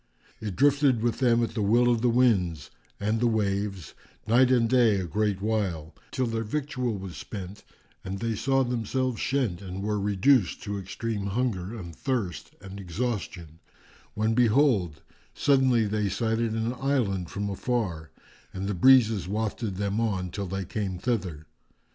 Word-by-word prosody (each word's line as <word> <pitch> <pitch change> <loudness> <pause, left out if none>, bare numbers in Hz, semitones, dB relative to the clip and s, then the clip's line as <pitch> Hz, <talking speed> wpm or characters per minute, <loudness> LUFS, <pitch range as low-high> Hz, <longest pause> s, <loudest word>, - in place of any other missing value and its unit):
It 105 -4 -4
drifted 140 - +3
with 120 -2 0
them 120 -2 +3
at 115 - -2
the 110 - -3
will 115 +4 +4
of 120 -2 +2
the 125 - +3
winds 100 - +2 0.3
and 105 +2 0
the 120 - +2
waves, 100 - -1 0.3
night 120 +4 +4
and 120 -3 +3
day 120 -3 +4
a 95 - -1
great 100 +3 -1
while, 95 -8 -1 0.2
till 130 -2 -1
their 115 -1 -2
victual 125 -2 -2
was 95 -2 -7
spent 100 -1 -8 0.4
and 95 +1 -4
they 115 +2 -2
saw 135 +5 +1
themselves 125 +1 -1
shent 125 -10 -1
and 95 0 -6
were 105 0 -1
reduced 105 +3 +2
to 100 0 -3
extreme 100 +2 -4
hunger 105 -2 -2
and 85 -5 -8
thirst 120 - -3
and 100 0 -9
exhaustion, 95 -4 -4 0.6
when 110 +1 +1
behold, 110 - +2 0.3
suddenly 130 -5 +3
they 105 -1 0
sighted 115 +2 0
an 115 +2 -1
island 125 -10 -1
from 100 0 -3
afar 95 -6 -2 0.5
and 95 +1 -3
the 100 - -1
breezes 110 -2 +5
wafted 105 0 -2
them 100 +2 -1
on, 95 -5 -1
till 100 +2 -4
they 95 +1 -3
came 95 -1 -3
thither. 90 -8 -2
110 Hz, 160 wpm, -27 LUFS, 95-120 Hz, 0.6 s, breezes